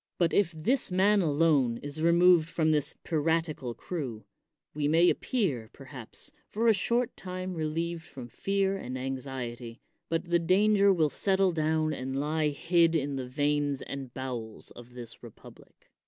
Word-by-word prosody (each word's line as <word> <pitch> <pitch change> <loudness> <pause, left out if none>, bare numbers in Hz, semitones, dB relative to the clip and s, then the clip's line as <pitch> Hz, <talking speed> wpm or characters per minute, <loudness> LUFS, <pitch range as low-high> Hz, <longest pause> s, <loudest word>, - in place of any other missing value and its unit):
But 170 -2 +1
if 195 -5 +3
this 180 - +1
man 200 +3 +4
alone 145 -6 +2
is 145 +2 -3
removed 170 0 +5
from 160 -2 +1
this 150 -2 +1
piratical 155 -5 -1
crew, 130 -11 -5 0.5
we 145 -1 -1
may 165 +3 +5
appear, 150 - -2
perhaps, 135 - -7 0.2
for 225 +3 0
a 225 - +7
short 235 +4 0
time 185 0 -5
relieved 165 +1 -2
from 130 -7 -10
fear 195 +8 -1
and 130 -7 -6
anxiety, 130 -3 -5 0.3
but 165 +1 0
the 170 - +4
danger 200 +3 +4
will 165 -5 +3
settle 190 +3 +2
down 155 -1 0
and 130 -1 -4
lie 155 +1 0
hid 165 +3 +2
in 140 -2 -1
the 130 -2 -4
veins 145 +1 0
and 135 -2 -7
bowels 120 -4 -6
of 120 +1 -14
the 120 -2 -4
republic. - - -16
155 Hz, 155 wpm, -29 LUFS, 135-180 Hz, 0.5 s, a